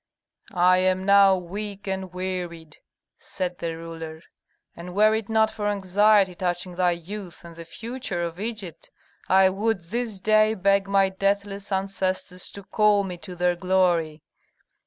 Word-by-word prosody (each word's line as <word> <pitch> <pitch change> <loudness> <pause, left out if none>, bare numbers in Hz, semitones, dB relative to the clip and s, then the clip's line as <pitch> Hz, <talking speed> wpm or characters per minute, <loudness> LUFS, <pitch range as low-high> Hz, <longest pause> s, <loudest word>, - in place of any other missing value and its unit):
"I 180 +1 +4
am 185 0 +1
now 200 -1 +6
weak 200 +3 -6
and 190 -2 -4
wearied," 180 -4 -5 0.4
said 180 -2 -5
the 165 -1 -4
ruler, 165 -1 -8 0.5
"and 175 +1 -9
were 215 +1 +5
it 220 -1 -2
not 220 0 +3
for 210 -1 -3
anxiety 200 0 +3
touching 180 0 -3
thy 175 0 +2
youth 175 +1 -9
and 170 -1 -11
the 165 0 -10
future 225 -1 -5
of 170 +1 -5
Egypt, 205 -7 -6 0.4
I 190 0 +6
would 215 +2 0
this 215 +4 -4
day 215 +2 +3
beg 195 0 +2
my 195 -1 +3
deathless 200 +1 -2
ancestors 190 -1 -2
to 200 - -9
call 210 0 +3
me 180 -2 -6
to 180 -1 -9
their 175 0 +1
glory. 175 -4 +1
190 Hz, 150 wpm, -24 LUFS, 175-200 Hz, 0.5 s, now